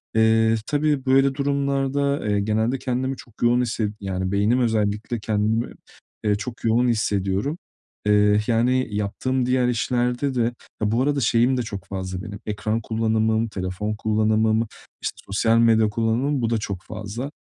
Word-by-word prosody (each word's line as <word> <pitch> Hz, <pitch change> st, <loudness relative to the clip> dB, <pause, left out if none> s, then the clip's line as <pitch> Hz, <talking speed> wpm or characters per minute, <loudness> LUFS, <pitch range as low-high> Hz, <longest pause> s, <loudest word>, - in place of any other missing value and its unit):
Eee, 110 Hz, 0 st, +4 dB
tabii 145 Hz, -2 st, 0 dB
böyle 135 Hz, +1 st, +4 dB
durumlarda, 140 Hz, -1 st, 0 dB
eee, 105 Hz, 0 st, +2 dB
genelde, 110 Hz, +5 st, 0 dB
kendimi 130 Hz, +1 st, -2 dB
çok 120 Hz, -, -14 dB
yoğun 120 Hz, +1 st, +4 dB
hisse 115 Hz, -3 st, -1 dB
yani 95 Hz, -1 st, -3 dB
beynim 105 Hz, +5 st, +2 dB
özellikle 110 Hz, -1 st, 0 dB
kendimi, 110 Hz, +2 st, 0 dB, 0.5 s
eee, 105 Hz, -1 st, +2 dB
çok 115 Hz, +3 st, -7 dB
yoğun 115 Hz, +2 st, +3 dB
hissediyorum. 105 Hz, -, 0 dB, 0.5 s
Eee, 105 Hz, 0 st, +4 dB
yani 125 Hz, +3 st, +2 dB
yaptığım 125 Hz, +5 st, -1 dB
diğer 125 Hz, 0 st, +2 dB
işlerde 125 Hz, +2 st, 0 dB
de 120 Hz, -, +1 dB, 0.4 s
ya 105 Hz, 0 st, +1 dB
bu 115 Hz, +3 st, +2 dB
arada 145 Hz, 0 st, +1 dB
şeyim 120 Hz, +1 st, +3 dB
de -, -, +1 dB
çok 100 Hz, -4 st, -7 dB
fazla 95 Hz, -1 st, -4 dB
benim: 105 Hz, -2 st, -7 dB
ekran 105 Hz, +2 st, -2 dB
kullanımım, 110 Hz, 0 st, +1 dB
telefon 100 Hz, +1 st, -3 dB
kullanımım, 110 Hz, +1 st, +1 dB, 0.3 s
işte, -, -, -3 dB
sosyal 115 Hz, +3 st, +2 dB
medya 110 Hz, -2 st, +4 dB
kullanımım, 115 Hz, +6 st, 0 dB
bu 115 Hz, -, 0 dB
da 115 Hz, -, +1 dB
çok 100 Hz, -4 st, -4 dB
fazla. 110 Hz, +6 st, -6 dB
115 Hz, 150 wpm, -23 LUFS, 105-125 Hz, 0.5 s, Eee